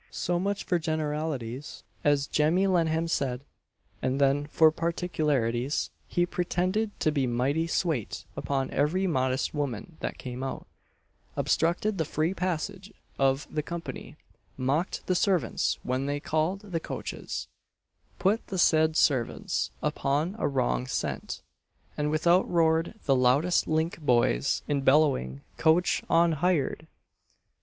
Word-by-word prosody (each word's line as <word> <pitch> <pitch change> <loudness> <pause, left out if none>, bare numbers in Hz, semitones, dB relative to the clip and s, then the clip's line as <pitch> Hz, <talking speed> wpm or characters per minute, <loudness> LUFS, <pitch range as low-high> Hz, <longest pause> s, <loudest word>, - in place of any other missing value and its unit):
So 175 0 -1
much 200 +2 -1
for 175 - +1
generalities, 150 -5 -3 0.2
as 145 -1 +3
Jemmy 160 +7 +2
Lennam 165 -3 +2
said; 130 -5 -1 0.6
and 130 +2 0
then 140 +1 +2
for 160 +1 +5
particularities, 150 -7 -1 0.2
he 175 - +1
pretended 185 +5 -1
to 155 - +3
be 140 -4 0
mighty 135 +7 0
swate 160 - -1
upon 135 -1 -2
every 170 +7 +1
modest 130 -6 0
woman 145 - -4
that - - -4
came 125 0 -6
out, 135 - -4 0.7
obstructed 180 +5 +1
the 160 - +1
free 155 +5 0
passage 185 +2 -3 0.3
of 135 +1 +2
the 150 - 0
company, 170 +2 -7 0.4
mocked 140 +8 -1
the 185 - +1
servants 185 -1 +1
when 130 +2 -1
they 145 0 -1
called 160 +6 -1
the 190 -6 -3
coaches, - - -5 0.7
put 210 +4 +1
the 190 - -4
said 160 -2 +4
servants 130 -6 +1
upon 150 +8 0
a - - +1
wrong 60 - 0
scent, - - -3 0.5
and 150 +1 0
out 175 +2 +4
roared 165 +2 +2
the 135 - +4
loudest 135 +8 +3
link 160 +2 0
boys 120 - +2
in 145 -1 0
bellowing 135 - +3 0.2
"coach 165 +3 +3
on 170 0 +4
hired!" 160 -1 0
155 Hz, 130 wpm, -28 LUFS, 135-175 Hz, 0.7 s, for